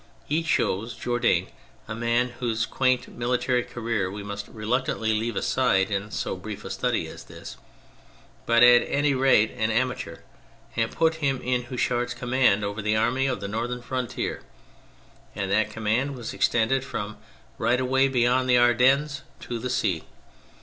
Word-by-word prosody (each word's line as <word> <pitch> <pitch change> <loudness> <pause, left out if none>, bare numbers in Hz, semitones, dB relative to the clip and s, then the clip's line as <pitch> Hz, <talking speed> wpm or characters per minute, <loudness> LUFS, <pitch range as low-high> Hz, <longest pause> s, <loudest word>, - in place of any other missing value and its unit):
He 155 +3 +1
chose 115 - 0
Jourdan, 120 0 0 0.4
a - - -4
man 120 +2 +1
whose 115 -2 0
quaint 130 0 +1
military 125 +1 0
career 115 -5 -2
we 100 +1 -7
must 100 0 -6
reluctantly 110 0 -1
leave 110 +1 -1
aside 105 -7 +1
in 100 +1 -2
so - - -3
brief 100 +2 -8
a - - -5
study - - -1
as - - -10
this, - - -10 0.9
but 115 +1 +5
at 120 0 +8
any 145 0 +1
rate 130 -5 +4
an 110 -2 -1
amateur, 125 -6 -2 0.5
and 115 -1 +1
put 160 -1 +1
him 135 -2 +1
in 125 -1 0
Houchard's 120 -1 -1
command 125 -5 +2
over 100 +2 -4
the 105 +1 +1
Army 130 +4 +1
of 130 - -2
the 100 - -3
Northern 120 +4 -3
Frontier, 125 -1 -3 0.9
and 95 -1 -3
that 110 +2 +2
command 115 +6 -1
was 120 -3 -6
extended 120 +3 +2
from 105 -5 -5 0.4
right 120 +3 +2
away 130 +1 +3
beyond 130 0 +2
the 125 - +6
Ardennes 130 +4 +3 0.2
to 120 -1 -5
the 125 - -4
sea. 105 -10 0
120 Hz, 155 wpm, -25 LUFS, 110-130 Hz, 0.9 s, at